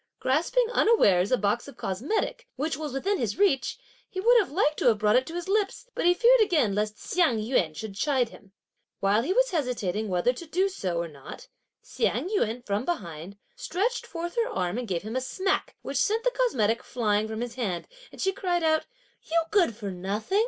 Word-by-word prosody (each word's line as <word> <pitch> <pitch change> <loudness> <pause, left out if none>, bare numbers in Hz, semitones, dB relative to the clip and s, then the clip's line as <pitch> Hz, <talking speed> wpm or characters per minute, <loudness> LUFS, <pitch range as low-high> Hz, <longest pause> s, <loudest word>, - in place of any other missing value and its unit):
Grasping 340 - +2
unawares 205 - +4
a 255 - +4
box 210 +4 0
of 280 - -12
cosmetic, 240 - -2
which 295 +3 -1
was 300 0 -5
within 385 +10 -1
his 225 -4 -2
reach, 380 -9 +2 0.3
he 375 - -5
would 470 +6 +5
have 390 - -1
liked 300 -2 +1
to - - +1
have 225 -3 +5
brought 210 +1 +3
it 255 +1 +3
to 330 - -7
his 350 0 -4
lips, 420 +5 -1
but - - 0
he 355 - +6
feared 485 +3 +5
again 305 - +3
lest 210 +1 -1
Hsiang 335 -10 +1
yün 215 -9 0
should 215 +4 -6
chide 250 +3 +1
him. 195 - -16 0.5
While 200 +3 +3
he 275 - -2
was - - +3
hesitating 230 - -1
whether 180 +7 +2
to 330 +6 -9
do 370 +5 +1
so 185 - -3
or 170 0 -1
not, 140 -4 -11 0.3
Hsiang 365 - -1
yün, 245 - -1
from 200 +3 -1
behind, 190 - -5 0.2
stretched 425 +8 -2
forth 345 0 -5
her 470 +1 +1
arm 205 - -2
and 245 - -5
gave 180 -3 -2
him 220 +3 -5
a 260 - 0
smack, 380 +9 -1
which 275 - -3
sent 435 - +1
the - - +2
cosmetic 235 - +1
flying 215 -3 0
from 220 +1 -5
his 240 -1 -4
hand, 195 -9 -3 0.2
as - - -6
she 385 - +2
cried 355 -3 -1
out: 315 -1 +2 0.4
"You 335 +1 +3
good 350 - +3
for 205 -3 -5
nothing! 200 - -1
260 Hz, 210 wpm, -27 LUFS, -, 0.5 s, he